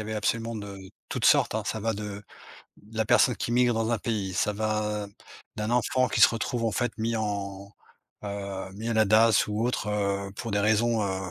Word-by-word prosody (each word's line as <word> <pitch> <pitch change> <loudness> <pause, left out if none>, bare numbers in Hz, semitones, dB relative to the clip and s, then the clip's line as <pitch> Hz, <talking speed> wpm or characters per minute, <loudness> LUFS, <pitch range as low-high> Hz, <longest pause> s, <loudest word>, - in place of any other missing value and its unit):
avait 110 0 -5
absolument 115 +2 -1
de 100 -2 -7 0.3
toutes - - -3
sortes, - - +4
hein. - - -1
Ça 110 - -2
va 115 +1 -1
de 105 0 -6 0.6
de 110 +2 -13
la 110 - +3
personne 125 +3 +4
qui - - -3
migre 120 0 +3
dans 115 0 0
un 115 - +2
pays, 105 -3 -3
ça 105 +3 0
va 105 0 -1 0.5
d'un 105 +1 -2
enfant 125 +2 +2
qui - - 0
se - - +9
retrouve, 115 +1 -2
en 115 - +1
fait, 120 +3 -1
mis 115 +1 -1
en, 100 -2 -4 0.5
heu, 100 -2 -5
mis 110 +4 -6
à 115 - 0
la 110 0 +4
DASS 110 +1 +4
ou 105 +1 -2
autre, 120 -4 -1
heu, 100 -1 -1
pour 115 +2 -6
des 100 - +1
raisons, 110 +2 +2
heu, 95 -1 -3
105 Hz, 210 wpm, -27 LUFS, 100-115 Hz, 0.6 s, se